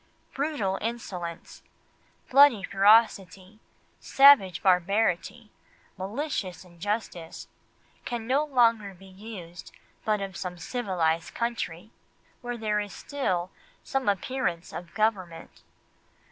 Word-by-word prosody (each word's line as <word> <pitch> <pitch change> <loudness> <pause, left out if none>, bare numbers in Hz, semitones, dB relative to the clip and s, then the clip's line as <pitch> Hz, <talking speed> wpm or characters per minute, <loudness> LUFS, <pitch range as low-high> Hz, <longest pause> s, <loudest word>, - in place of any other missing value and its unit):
Brutal 265 -10 -1
insolence, 185 -7 -6 0.7
bloody 270 -6 +6
ferocity, 195 -1 +2 0.4
savage 270 - +5
barbarity, 200 +4 +1 0.4
malicious 195 - -4
injustice, 175 -1 -5 0.6
can 235 -2 -4
no 270 +5 +2
longer 230 -8 +2
be 190 +2 -16
used 190 -3 -10 0.3
but 215 -1 +1
of 195 -2 -6
some 180 0 -5
civilised 175 -6 -2
country, 230 -5 -3 0.5
where 245 0 -5
there 210 -2 0
is 205 -2 -5
still 185 -11 -3 0.3
some 270 -5 -1
appearance 195 -3 -2
of 170 -1 -8
government. 195 -6 -2
205 Hz, 95 wpm, -27 LUFS, 180-235 Hz, 0.7 s, bloody